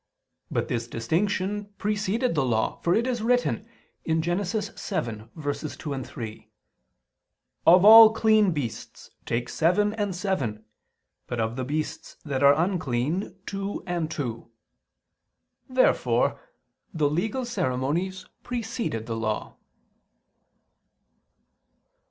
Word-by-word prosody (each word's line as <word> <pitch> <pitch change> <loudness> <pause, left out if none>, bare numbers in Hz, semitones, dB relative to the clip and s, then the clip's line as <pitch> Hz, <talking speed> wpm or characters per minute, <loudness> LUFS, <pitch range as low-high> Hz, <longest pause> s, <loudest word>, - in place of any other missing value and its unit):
But - - -1
this 115 -1 -2
distinction 195 - -1
preceded 210 +3 0
the 150 -4 +1
Law; 115 -4 0
for 175 - +2
it 230 - +2
is 245 -3 -1
written 245 -1 +1 0.4
(Gen. 160 0 +1 0.2
7:2, 145 - -4
3): 110 -2 -8 1.2
"Of 180 +3 +7
all 220 0 +11
clean 220 -3 +3
beasts 140 -8 -6 0.2
take 120 +1 -1
seven 205 +9 +2
and 205 -4 -2
seven... 135 - -2 0.6
but 120 - -4
of 110 +1 -1
the 130 - -3
beasts 150 +4 -4
that 140 -3 -2
are 140 0 +7
unclean, 160 0 -1
two 195 0 -4
and 175 -3 -2
two." 125 -8 -5 1.2
Therefore 255 0 +2 0.5
the 155 -5 +1
legal 210 - -1
ceremonies 175 - -2 0.2
preceded 230 - -3
the 115 - -3
Law. 110 -1 -3
170 Hz, 105 wpm, -26 LUFS, 130-210 Hz, 1.2 s, all